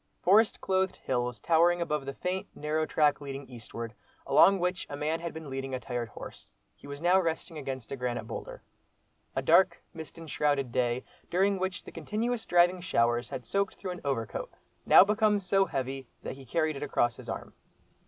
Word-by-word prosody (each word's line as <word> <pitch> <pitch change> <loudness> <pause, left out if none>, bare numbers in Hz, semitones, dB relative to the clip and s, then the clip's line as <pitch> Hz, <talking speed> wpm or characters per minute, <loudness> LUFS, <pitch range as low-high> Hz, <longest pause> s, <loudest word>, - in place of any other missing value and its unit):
Forest 210 +4 +4
clothed 190 0 +1
hills 125 -2 -2
towering 170 +6 +4
above 150 -5 -2
the 140 - -4
faint, 185 +1 -3
narrow 155 +1 -1
track 150 -2 +2
leading 140 -1 -6
eastward, 115 -2 -8 0.3
along 190 +8 +6
which 180 0 -1
a 145 - -5
man 155 +3 -1
had 170 -1 -4
been 160 -1 -8
leading 135 -1 -4
a - - -3
tired 120 -1 -4
horse; - - -10 0.3
he - - -14
was 140 +2 -7
now 180 +2 +5
resting 165 -1 -3
against 135 -5 -5
a - - -2
granite 125 -2 -2
boulder. - - -7 0.7
A - - -1
dark, 185 -2 +4
mist 160 -2 -9
enshrouded 145 -5 0
day, 125 0 0 0.3
during 195 +2 +2
which 185 -1 -2
the - - -10
continuous 230 +2 -2
driving 175 +1 +4
showers 120 -8 +1
had 125 - -6
soaked 200 +8 0
through 185 - -5
an 180 - -7
overcoat, 135 -6 -2 0.4
now - - +9
become 210 0 +2
so 195 0 +2
heavy 135 -4 -4 0.2
that - - -4
he 135 0 -12
carried 155 +4 0
it 140 - -6
across 120 -5 +1
his - - -10
arm. - - -5
155 Hz, 185 wpm, -29 LUFS, 135-185 Hz, 0.7 s, now